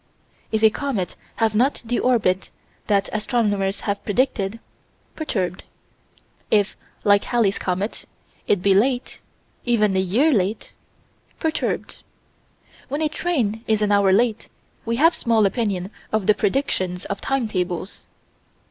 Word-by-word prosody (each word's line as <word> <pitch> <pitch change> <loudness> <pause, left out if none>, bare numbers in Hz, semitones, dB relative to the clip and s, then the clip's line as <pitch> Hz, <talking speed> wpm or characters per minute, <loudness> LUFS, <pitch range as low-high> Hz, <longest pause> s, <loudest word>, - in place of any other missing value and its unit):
If 220 0 0
a 220 - +7
comet 230 -9 -3 0.2
have 225 -2 +1
not 250 +6 +1
the 245 +2 0
orbit 210 -7 +1 0.4
that 200 -2 +2
astronomers 205 -3 0
have 200 -1 -2
predicted 220 -2 0 0.6
perturbed. 185 - -2 0.9
If 205 -1 +2 0.3
like 205 -1 +4
Halley's 225 -5 +1
comet 190 +4 -3 0.4
it 195 -3 +2
be 200 - +5
late 245 +6 +1 0.4
even 215 -5 +2
a - - +3
year 230 - +3
late 205 0 -1 0.7
perturbed. 320 -1 -2 0.9
When 290 +4 -2
a 305 - +2
train 240 -11 -1
is 215 -1 +2
an 205 - +1
hour 200 -1 +4
late, 225 +2 +1 0.4
we 230 0 0
have 325 +7 +5
small 225 -3 +2
opinion 200 -3 -1 0.2
of 215 -3 0
the 210 - +6
predictions 195 -6 -1
of 200 - -4
timetables. 195 -8 -2
215 Hz, 130 wpm, -22 LUFS, 195-240 Hz, 0.9 s, a